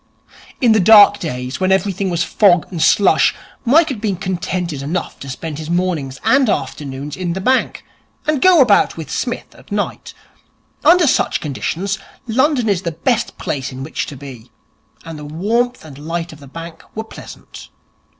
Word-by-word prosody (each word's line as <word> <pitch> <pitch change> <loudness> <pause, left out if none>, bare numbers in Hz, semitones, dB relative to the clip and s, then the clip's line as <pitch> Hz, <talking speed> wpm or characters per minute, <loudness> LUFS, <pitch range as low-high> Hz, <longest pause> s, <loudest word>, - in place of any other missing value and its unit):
In 240 -3 +4
the 220 - +4
dark 205 +1 +7
days, 125 -5 -4
when 190 0 +1
everything 195 0 0
was 170 -1 0
fog 180 -4 +3
and 170 -3 -4
slush, 200 - +4 0.3
Mike 310 +7 +4
had 245 -7 -5
been 210 -3 0
contented 175 -4 -3
enough 160 +5 -4
to 140 - -8
spend 150 +3 -6
his 155 0 -7
mornings 170 -7 -1
and 270 -3 +3
afternoons 140 -1 -3
in 180 -2 -3
the 190 - -4
bank, 255 +7 0 0.4
and 305 -3 0
go 365 -5 +6
about 215 -9 +3
with 155 -3 -7
Psmith 245 -1 -4
at - - -19
night. - - -3 0.7
Under 340 +3 +6
such 275 - +1
conditions, 180 +7 -3 0.3
London 255 +1 +1
is 195 -4 +1
the 170 - -3
best 240 +7 -1
place 135 -2 -4
in 130 +1 -7
which 155 - -4
to 140 - -8
be, 125 -4 -11 0.6
and 165 -2 -8
the - - -8
warmth 215 +10 -1
and 140 -3 -11
light 165 +2 -4
of 155 - -14
the 140 - -13
bank 165 +4 -9
were 220 - -3
pleasant. 220 - -12
180 Hz, 175 wpm, -18 LUFS, 150-220 Hz, 0.7 s, dark